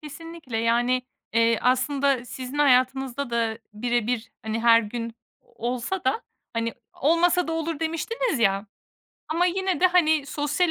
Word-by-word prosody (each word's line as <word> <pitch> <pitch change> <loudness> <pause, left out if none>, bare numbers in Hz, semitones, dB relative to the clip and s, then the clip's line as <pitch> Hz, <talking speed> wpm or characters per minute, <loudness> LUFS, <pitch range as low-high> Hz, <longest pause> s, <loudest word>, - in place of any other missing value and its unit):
Kesinlikle. 310 -4 -8
Yani, 240 +2 +2 0.3
eee, 230 0 +3
aslında 260 0 +2
sizin 255 +3 -7
hayatınızda 265 -1 +2
da 230 -1 0
birebir, 240 +1 -1
hani, 220 +1 -2
her 230 0 +6
gün 230 +1 -5 0.3
olsa 250 +10 -4
da, 260 +12 +1 0.3
hani, 230 0 -2 0.2
olmasa 335 +3 +2
da - - -1
olur 325 -1 -2
demiştiniz 330 - -1
ya. 200 -1 +2 0.6
Ama 335 +3 +2
yine 375 0 0
de, 370 - +7
hani, 315 -5 +3
sosyal 295 +5 0
260 Hz, 135 wpm, -25 LUFS, 235-325 Hz, 0.6 s, de